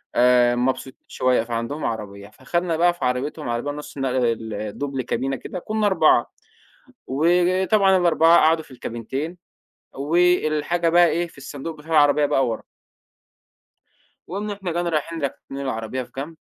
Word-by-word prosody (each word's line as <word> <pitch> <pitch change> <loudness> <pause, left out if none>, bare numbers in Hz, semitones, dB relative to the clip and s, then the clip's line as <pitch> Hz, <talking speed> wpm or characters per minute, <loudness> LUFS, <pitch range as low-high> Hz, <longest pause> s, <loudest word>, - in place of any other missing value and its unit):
آآ، 120 0 +4
مبسوطين 130 +1 -2
شوية، 125 -3 +1
فعندهم 115 +6 -4
عربية 100 -3 -5
فخدنا 170 +8 -2
بقى 175 +1 +4
في 175 - -4
عربيتهم، 125 +3 -2
عربية 120 +5 -2
نُص 150 0 -9
نقل 130 -2 0
ال 115 -2 -2
الدُبل 130 +7 -4
كابينة 130 +2 -2
كده، 180 +7 -7
كنّا 215 +3 -2
4 190 - +3 0.8
وطبعًا 185 - +3
ال4 170 -1 +5
قعدوا 160 +1 +3
في 140 - -20
الكابينتين، 130 +8 -5 0.6
والحاجة 165 +2 +1
بقى 175 +1 +6
إيه، 170 +1 0
في 165 - -20
الصندوق 140 +4 -7
بتاع 155 +2 -14
العربية 145 -1 +4
بقى 135 -3 +2
ورا. 115 - -4 1.6
وقمنا 205 +3 -4
إحنا 195 -4 -5
جينا 175 +1 -1
رايحين 165 0 -2
راكنين 140 0 -5
العربية 130 -1 -3
في - - -18
جنب، 150 +5 -5
145 Hz, 145 wpm, -22 LUFS, 125-170 Hz, 1.6 s, بقى